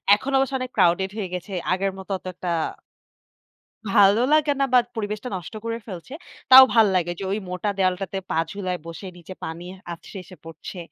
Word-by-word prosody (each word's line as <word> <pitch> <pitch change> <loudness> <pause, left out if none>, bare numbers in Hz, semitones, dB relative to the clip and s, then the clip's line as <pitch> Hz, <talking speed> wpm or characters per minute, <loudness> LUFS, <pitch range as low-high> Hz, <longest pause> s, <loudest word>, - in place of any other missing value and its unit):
এখন 270 +6 -5
অবশ্য 270 0 +1
অনেক 255 - -4
crowded 180 +3 +3
হয়ে 200 -4 -3
গেছে। 180 +2 -5 0.2
আগের 195 +1 0
মতো 190 +1 -9
অতটা 180 -1 -6 1.4
ভালো 200 +2 +5
লাগে 305 -1 +4
না - - +4
বা 250 - +7 0.2
পরিবেশটা 210 +3 -4
নষ্ট 180 +4 -9
করে 230 0 -3
ফেলছে। 190 +4 -9 0.4
তাও 260 0 +12
ভালো 225 -2 +6
লাগে 175 -1 0
যে 195 - -5
ওই 205 - 0
মোটা 180 +3 -2
দেয়ালটাতে 190 +1 0
পা 160 - 0
ঝুলায় 185 -3 -3
বসে 165 +4 -8
নিচে 175 +2 -10
পানি 160 +2 -6 0.3
আছড়ে 170 +3 -10
এসে 185 - -14
পড়ছে। 165 +3 -9
195 Hz, 175 wpm, -23 LUFS, 180-220 Hz, 1.4 s, তাও